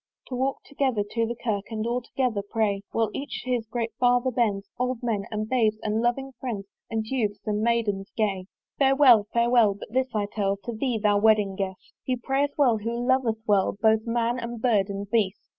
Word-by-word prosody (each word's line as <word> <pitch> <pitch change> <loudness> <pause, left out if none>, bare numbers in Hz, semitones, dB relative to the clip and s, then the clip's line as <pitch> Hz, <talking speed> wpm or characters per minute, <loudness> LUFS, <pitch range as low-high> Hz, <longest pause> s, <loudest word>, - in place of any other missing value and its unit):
To 255 - -3
walk 265 +2 -1
together 265 -7 0
to 230 -1 0
the 235 - -3
Kirk 210 -4 -2
And 220 -1 -3
all 240 +2 -1
together 245 -4 -1
pray, 205 -1 -1
While 225 -2 0
each 285 +1 -5
to 255 - -4
his 235 -3 -1
great 230 0 -3
father 245 +1 +3
bends, 210 -5 0
Old 250 -1 -1
men, 215 -5 -1
and 215 0 -3
babes, 220 -3 +2
and 215 +1 0
loving 265 +3 0
friends, 220 -7 -4 0.2
And 225 -1 -2
Youths, 220 -4 -2
and 210 -1 -1
Maidens 220 -4 0
gay. 195 -4 0 0.3
Farewell, 265 -6 +6
farewell! 235 -3 +4
but 205 - -11
this 260 0 +2
I 210 -1 +1
tell 200 -1 -1
To 235 - -4
thee, 240 +1 -1
thou 205 -1 +2
wedding 210 -2 +3
guest! 190 -1 -5
He 255 - 0
prayeth 270 +4 -1
well 245 -7 +4
who 230 +3 -3
loveth 245 -3 +1
well 200 -1 +2
Both 220 +1 +3
man 235 +1 0
and 235 0 -5
bird 220 -5 +2
and 200 0 -4
beast. 210 -3 +1
225 Hz, 200 wpm, -26 LUFS, 210-245 Hz, 0.3 s, Farewell